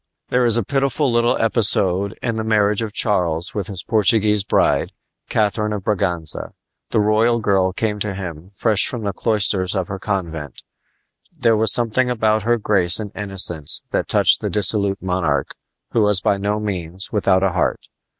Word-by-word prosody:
There 125 0 +2
is 115 -1 +2
a 120 - 0
pitiful 135 +3 0
little 120 0 +2
episode 100 -3 +1
in 115 - -1
the 110 - -2
marriage 105 -1 +1
of 110 -2 -4
Charles 90 -6 0
with 100 -3 -3
his 95 -4 -5
Portuguese 105 -1 +2
bride, - - +1 0.4
Catharine 105 0 0
of 100 -2 -5
Braganza. 90 -6 -2 0.4
The - - +1
royal 110 +3 +2
girl 95 -3 +1
came 105 +2 -2
to 105 -1 -3
him 90 -2 -7
fresh 110 0 +4
from 120 -3 -3
the 100 -1 -2
cloisters 100 -2 0
of 95 -2 -2
her 95 -1 -5
convent. 80 - -4 0.7
There 115 -1 +1
was 110 -2 +4
something 120 +3 +2
about 110 -2 +1
her 120 +3 +1
grace 95 -5 +1
and 105 -2 -6
innocence 95 -7 -2
that - - -1
touched - - +3
the - - -2
dissolute 100 -2 0
monarch, 90 -6 -1 0.4
who 115 - +1
was 105 -2 +4
by 100 - +1
no 105 +2 -2
means 95 -3 -4
without 95 -2 +2
a 95 - +2
heart. 90 - -1
105 Hz, 170 wpm, -19 LUFS, 95-110 Hz, 0.7 s, fresh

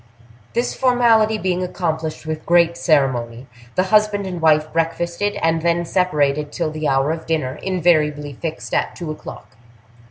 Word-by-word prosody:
This 240 +1 0
formality 230 -4 +3
being 185 -2 -1
accomplished 160 -4 -3
with 155 0 -4
great 170 -1 +3
ceremony, 130 -7 0 0.3
the 185 - +3
husband 210 -1 +3
and 180 -3 -5
wife 155 -1 +3
breakfasted, 170 +4 -1
and 165 0 +2
then 170 +1 +1
separated 150 -5 0
till 165 -2 -2
the 155 0 -3
hour 135 +2 +2
of 160 0 -5
dinner, 155 -6 -2
invariably 155 -6 +1
fixed 160 +4 -6
at - - 0
two 170 -3 -5
o'clock. 155 - -10
165 Hz, 150 wpm, -20 LUFS, 155-180 Hz, 0.3 s, formality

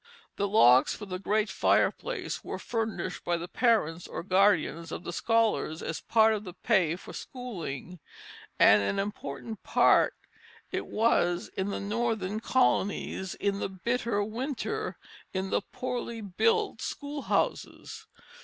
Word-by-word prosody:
The 200 - 0
logs 130 - +5
for 210 - -8
the 185 -2 -5
great 210 +3 +1
fireplace - - 0
were - - -5
furnished 220 -5 -3
by 175 0 0
the 170 +1 -6
parents 180 -8 +1
or - - -5
guardians 180 -4 +2
of - - -5
the 175 - -5
scholars 225 -6 +1
as 160 - -3
a - - -25
part 220 -1 +6
of 210 -1 -3
the 180 -3 -9
pay 185 -9 +2
for 180 - -11
schooling; 180 - -6 0.6
and 105 0 +7
an 100 - -1
important 200 +1 -5
part - - +4 0.6
it - - -3
was 175 -6 +1
in 190 +1 -1
the - - -3
northern 215 -1 -1
colonies, 200 -6 0
in 200 -1 -1
the - - -2
bitter 230 +2 -1
winter, 270 - -3 0.4
in 190 0 -2
the - - +2
poorly 245 -2 -4
built 420 - +1
schoolhouses. 285 -1 -3
205 Hz, 140 wpm, -29 LUFS, 180-230 Hz, 0.6 s, and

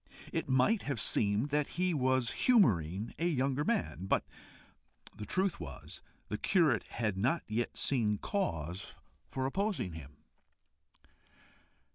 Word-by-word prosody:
It - - -2
might 135 - +3
have 140 -5 -2
seemed 105 +6 +2
that 150 0 +1
he 180 0 +2
was 130 -4 +2
humouring 105 - +3
a 170 - +1
younger 135 -2 +1
man, 180 - -1
but - - +2 0.9
the 105 -1 -7
truth 190 -1 0
was, 80 -5 -9 0.3
the 105 - -4
curate 160 - +2
had 105 -5 -2
not 135 - +1
yet 115 +3 -2
seen 110 -6 +1
cause 90 - -3 0.3
for 130 -1 -2
opposing 190 - -1
him. 75 -3 -10
130 Hz, 125 wpm, -33 LUFS, 100-165 Hz, 0.9 s, might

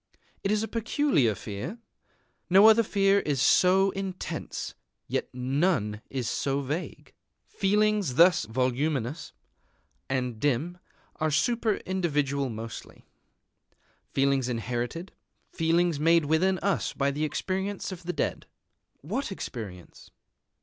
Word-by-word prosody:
It 195 - 0
is 215 0 +1
a - - -2
peculiar 225 - +1
fear. 105 - -6 0.7
No 195 +4 +8
other 220 +1 +7
fear 200 -2 +3
is 145 -7 -1
so 185 +7 +4
intense; 190 -1 -5 0.3
yet - - -2
none 125 - 0
is 130 -4 -3
so 140 0 -1
vague. 145 +6 -5 0.3
Feelings 205 -6 +1
thus 175 -6 +5
voluminous 130 +4 -1 0.8
and 125 -4 -2
dim 145 +7 0 0.4
are 155 -1 0
super 225 - +1
individual 145 -7 0
mostly, 115 0 -8 1.1
feelings 135 -2 +1
inherited, 120 - -3 0.4
feelings 165 -1 +1
made 165 +1 +4
within 180 +5 +2
us 200 - 0
by 140 0 0
the 150 +2 -3
experience 190 +6 -2
of 185 -2 -7
the 175 0 -3
dead. - - -2 0.5
What 220 - -3
experience? 105 - -8
160 Hz, 115 wpm, -27 LUFS, 130-190 Hz, 1.1 s, No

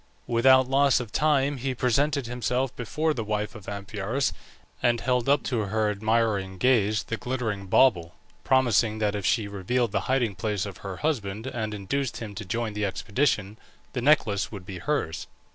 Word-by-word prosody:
Without 130 +2 +5
loss 135 0 +4
of 120 -4 -6
time 145 -1 +2
he 130 +1 -2
presented 140 +3 +1
himself 125 +2 -1
before 155 +6 -1
the 115 - -3
wife 105 0 -2
of 105 -4 -10
Amphiaraus, 100 +6 -2 0.5
and 120 -1 +2
held 125 +1 0
up 145 - +3
to 125 -4 -1
her 105 +1 0
admiring 105 -3 0
gaze 110 -2 +2
the 115 - -4
glittering 110 -6 -3
bauble, 90 -7 +3 0.3
promising 120 -4 +3
that 105 -2 0
if 100 -3 -2
she 110 -4 +1
revealed 100 +4 -1
the 100 - +1
hiding 125 -5 +2
place 105 +1 -2
of 100 -5 -7
her 95 -2 -7
husband 110 -8 -2
and 110 -5 -3
induced 125 +6 -2
him 110 -3 -6
to 105 +2 -6
join 115 +3 -2
the 105 0 -3
expedition, 105 +1 -1 0.3
the 125 - -2
necklace 120 -8 +3
should 100 -4 -8
be 95 -1 -7
hers. 145 - -2
115 Hz, 175 wpm, -26 LUFS, 100-130 Hz, 0.5 s, Without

